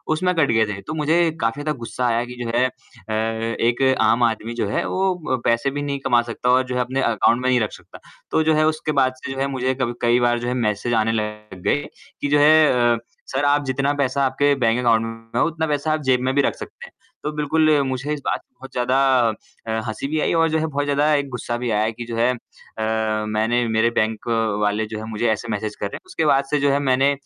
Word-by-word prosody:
उसमें 180 +3 +1
कट 155 -4 +2
गए 110 -1 +3
थे। 100 - -8
तो 100 - -6
मुझे 155 +2 +1 0.2
काफ़ी 115 +5 -1
ज़्यादा 150 -1 -2
गुस्सा 120 +2 -3
आया 115 0 +1
कि 125 0 -9
जो 115 - -4
है 125 - +4
अ, 130 -3 -11
एक 115 +2 -1 0.2
आम 110 +2 +3
आदमी 115 0 0
जो - - 0
है - - -1
वो 190 0 +1 0.2
व 130 - +2
पैसे 115 +4 +2
भी 145 +1 -4
नहीं 140 -1 -3
कमा 120 -3 +4
सकता 125 - -2
और 130 +1 +4
जो 125 - -3
है 125 - +1
अपने 130 +2 -1
अकाउंट 115 0 +2
में 130 - +2
नहीं 125 -1 +3
रख 110 -3 -1
सकता। - - -13 0.3
तो 160 - +2
जो - - +5
है 155 0 +3
उसके 155 -1 -1
बाद 130 0 +2
से - - -4
जो 135 - -5
है 135 - +1
मुझे 130 +1 0
क 120 -1 0
कई 120 +1 +3
बार 120 -1 +2
जो 120 - -4
है 125 - 0
मैसेज 105 +3 -1
आने 110 -1 +2
लग 105 -3 -5
गए 145 - +1 0.4
कि - - 0
जो 145 +1 +3
है 145 -6 +5
अ, - - -4 0.3
सर 135 +2 0
आप 145 0 +3
जितना 135 +2 0
पैसा 140 0 +1
आपके 140 +2 +2
बैंक 115 0 +2
अकाउंट 115 -2 +3 0.3
में - - +2
है, - - +3
उतना 160 -1 -2
पैसा 150 +1 -1
आप 155 - -1
जेब 130 -2 +3
में 130 +1 0
भी 140 - +4
रख - - 0
सकते - - -10
हैं। - - -17 0.3
तो 150 - -2
बिल्कुल 155 +1 +2 0.2
मुझे 130 +3 -2
इस 150 - -4
बात - - 0
पर - - -33
बहुत 135 +1 -11
ज़्यादा 125 +1 0 0.7
अ, - - -2 0.2
हँसी 110 +5 -4
भी 155 +2 -1
आई - - +1
और 165 -1 +3
जो 160 0 +1
है 160 - 0
बहुत 145 -1 -2
ज़्यादा 145 +2 +2
एक 140 -1 -1
गुस्सा 120 -2 -4
भी 120 0 -3
आया 105 +1 +1
कि 120 +1 -8
जो 115 0 -5
है 120 +2 +3
अ, 110 -2 -3
मैंने 110 +3 +1
मेरे 110 +1 +2
बैंक 110 +1 -2 0.3
वाले 105 +1 +1
जो 110 0 -6
है 110 - -6
मुझे 110 +2 -1
ऐसे 110 +2 -3
मैसेज 105 0 -3
कर - - -4
रहे 100 - -5
हैं। - - -8
उसके 160 - -2
बाद 140 -2 +4
से 150 - +2
जो 140 0 +2
है 140 - +2
मैंने 135 +2 +3
125 Hz, 260 wpm, -21 LUFS, 115-145 Hz, 0.7 s, जो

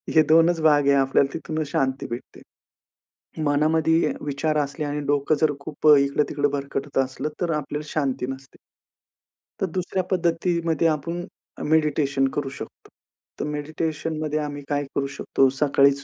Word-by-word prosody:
हे 155 - +7
2च 165 +1 +5
भाग 145 -2 +4
आहे, 140 - +6
आपल्याला 135 0 +2
तिथूनच 155 -1 -3
शांती 135 0 0
भेटते. 120 +1 -8 1.0
मनामध्ये 155 +2 +2
विचार 150 +2 -1
असले 145 +1 -2
आणि 145 0 -2
डोकं 145 +1 +2
जर 155 -2 +4
खूप 155 +1 -3
अ, 150 - +10
इकडं-तिकडं 145 +1 +1
भरकटत 140 0 -4
असलं 135 +3 -1
तर 175 -2 +1
आपल्याला 150 0 -4
शांती 135 -4 -1
नसते. 135 0 -11 1.0
तर - - +3
दुसऱ्या 185 +1 -1
पद्धतीमध्ये 170 -2 +1
आपण 165 +3 -2 0.3
अ, - - -8
मेडिटेशन 150 -3 +2
करू 140 -2 -1
शकतो. - - -10 0.5
तर - - -1
मेडिटेशनमध्ये 155 +1 -3
आम्ही 145 -1 -4
काय 145 0 0
करू 140 0 0
शकतो, 135 - +2
सकाळीच 140 0 +3
150 Hz, 140 wpm, -24 LUFS, 140-160 Hz, 1.0 s, अ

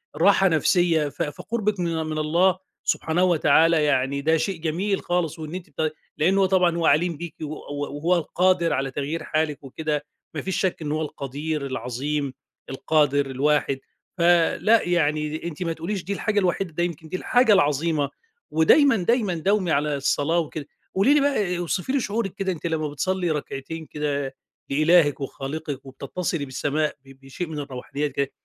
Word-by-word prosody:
راحة 195 -1 +5
نفسية 165 -2 +2
ف 140 - -8
فقربِك 210 +6 -2
من 165 -2 -1
من 155 0 -3
الله 175 +5 +3 0.3
سبحانه 165 +3 +1
وتعالى 165 -2 +4
يعني 140 -1 +1
ده 160 +3 +3
شيء 165 +2 -2
جميل 185 +5 -1
خالص، 175 -3 -1
وإن 155 +2 -6
أنتِ 185 - -7
ب 155 - +2 0.3
لأنّه 190 +5 +3
طبعًا 180 -2 +3
هو 170 - 0
عليم 165 0 +3
بيكِ 170 0 -7
و - - -2
و 145 -1 -5
وهو 175 +4 +2
القادر 175 +1 +2
على 135 0 -1
تغيير 145 +5 -3
حالِك 155 -2 -1
وكده، 150 +2 -3 0.3
ما 150 - -3
فيش 190 - -2
شَك 185 -3 -1
إن 150 - -3
هو 155 +1 -1
القدير 150 0 -4
العظيم 135 +2 -3 0.4
القادر 145 0 +2
الواحد 140 +1 +1 0.4
فلأ، 175 +6 +4
يعني 155 -3 0
أنتِ 170 +1 -4
ما 165 -1 -1
تقوليش 175 +4 -4
دي 200 - -3
الحاجة 210 +1 0
الوحيدة، 185 -1 0
ده 175 - 0
يمكن 165 -2 -4
دي 185 - -2
الحاجة 245 0 +4
العظيمة 150 -3 +2 0.4
ودايمًا 230 - +5
دايمًا 210 +1 +1
داومي 185 +2 +1
على 150 0 +1
الصلاة 145 +4 +1
وكده. 155 -2 -4 0.3
قولي 200 +9 +4
لي 295 - +5
بقى 210 -11 +1
اوصفي 175 +6 -2
لي 275 - +2
شعورِك 205 -4 -2
كده 195 -1 -1
أنتِ 170 -3 -7
لمّا 155 -2 -1
بتصلّي 180 +3 -1
ركعتين 150 +2 -5
كده 145 -3 -3 0.3
لإلاهِك 155 +1 +4
وخالقِك 140 +1 -5
وبتتصلي 140 +4 -4
بالسماء 145 +3 -1
ب 135 0 -16
بشيء 135 +6 -5
من 155 -2 -5
الروحانيات 140 +1 -4
كده، 140 0 -1
160 Hz, 165 wpm, -24 LUFS, 145-180 Hz, 0.4 s, راحة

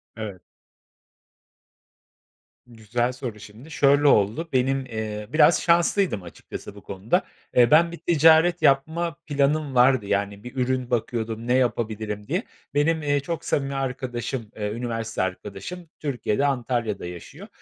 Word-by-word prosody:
Evet. 105 -5 -7 2.3
Güzel 120 +2 -2
soru. 125 -4 -6
Şimdi, 110 +10 -13
şöyle 145 0 +4
oldu. 115 +9 +3
Benim, 135 +1 +1
eee, 110 -3 -5
biraz 160 +1 +5
şanslıydım 170 - +2
açıkçası 90 +3 -9
bu 100 - -12
konuda. 105 - -1 0.3
Eee, 120 +1 +5
ben 165 +2 +6
bir 170 - -7
ticaret 165 +1 +4
yapma 160 +4 +2
planım 145 -1 0
vardı, 125 -3 +4
yani 100 0 -2
bir 125 +2 -9
ürün 130 -1 -1
bakıyordum 115 -1 -2
ne 125 - +2
yapabilirim 110 -4 -1
diye. 180 - -1 0.3
Benim, 155 +2 +1
eee, 145 -1 +2
çok 165 +3 -5
samimi 140 -1 -1
arkadaşım, 125 -3 -3
eee, 105 -1 -3
üniversite 115 -2 -3
arkadaşım 105 - -5
Türkiye'de, 135 -2 -1
Antalya'da 120 -7 -1
yaşıyor. 90 -1 -9
125 Hz, 130 wpm, -24 LUFS, 110-145 Hz, 2.3 s, ben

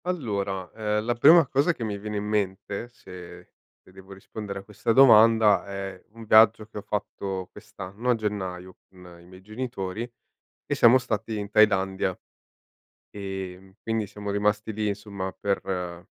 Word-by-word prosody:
Allora, 100 - -3
ehm, 105 -1 -2
la 120 - +1
prima 160 +7 +7
cosa 140 +6 +2
che 120 - -7
mi 105 -2 -3
viene 105 +1 -5
in 100 - -3
mente, 105 +1 -2
se 90 -7 -12 0.3
e - - -20
devo 95 +1 -13
rispondere 100 +1 -7
a - - -12
questa 105 +3 -2
domanda, 115 -4 +6
è 95 -1 -6
un 115 +1 -12
viaggio 110 0 +5
che 105 - -12
ho - - -8
fatto 95 -2 -4
quest'anno 105 +2 -7
a - - +3
gennaio 95 -4 -5
con 90 -2 -15
i - - -18
miei 95 +1 -15
genitori, 110 0 -5 0.5
e - - -2
siamo 120 +2 +6
stati 110 -3 -3
in 100 0 -5
Thailandia. 95 -3 +2 0.9
Ehm, 95 -1 -7
quindi 110 -2 -2
siamo 105 0 -7
rimasti 105 +2 0
lì 105 0 -2
insomma 100 -2 -5
per 90 -3 -3
105 Hz, 155 wpm, -25 LUFS, 95-110 Hz, 0.9 s, prima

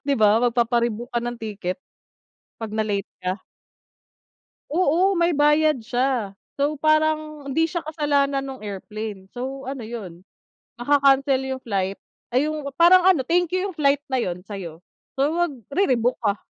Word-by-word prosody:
Di 280 - +3
ba, 215 +2 +4
magpapa-rebook 235 0 +1
ka 235 - +1
ng 240 0 -4
ticket 205 -4 -4 0.8
pag 225 -2 -5
na-late 210 -2 -1 0.2
ka. 185 +2 -2 1.3
Oo, 365 +4 +3
may 345 0 +3
bayad 295 -1 +3
siya. 240 -3 -1 0.2
So, 290 +2 +1
parang 310 -1 +1
hindi 320 +4 +2
siya 335 -1 -4
kasalanan 285 -3 +1
nung 270 -1 -7
airplane, 205 0 -6
so 265 +2 -5
ano 270 -4 -5
'yon, 190 -6 -8 0.6
maka-cancel 275 0 +3
yung 265 0 -4
flight 195 -3 -2 0.3
ay 265 +5 +2
yung 310 -1 -4 0.2
parang 355 +1 +7
ano, 370 -7 +5
thank 350 0 +2
you 370 +2 0
yung 375 - -9
flight 280 -1 +3
na 260 - 0
yun 180 -8 -2
sa'yo, 180 -5 -8 0.3
so 275 +2 +2
magre-rebook 270 - 0
ka. 205 -1 0
265 Hz, 145 wpm, -23 LUFS, 220-305 Hz, 1.3 s, parang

